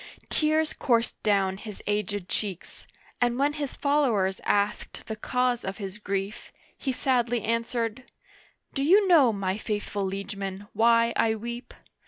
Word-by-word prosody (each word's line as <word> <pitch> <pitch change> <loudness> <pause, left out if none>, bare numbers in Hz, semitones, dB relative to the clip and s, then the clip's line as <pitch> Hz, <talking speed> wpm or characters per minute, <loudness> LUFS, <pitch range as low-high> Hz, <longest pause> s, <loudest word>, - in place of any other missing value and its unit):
Tears 310 0 +2
coursed 235 -3 +1
down 195 -2 +2
his 210 -1 -8
aged 205 -2 -1
cheeks, 195 -5 -5 0.3
and 240 0 +2
when 285 +2 +2
his 290 -3 -4
followers 240 -10 +1
asked 205 0 0
the 220 - -4
cause 250 +2 0
of 190 +1 -4
his 195 0 -6
grief, 200 +1 -4 0.2
he 270 - -2
sadly 245 -3 +1
answered: 230 +1 -1 0.4
" - - -34
Do 275 - -1
you 385 +8 +5
know, 305 -10 +6
my 195 -1 -2
faithful 205 -2 -3
liegemen, 195 0 -4
why 230 0 +4
I 220 -1 +2
weep 235 +3 -6
225 Hz, 145 wpm, -27 LUFS, 200-250 Hz, 0.4 s, know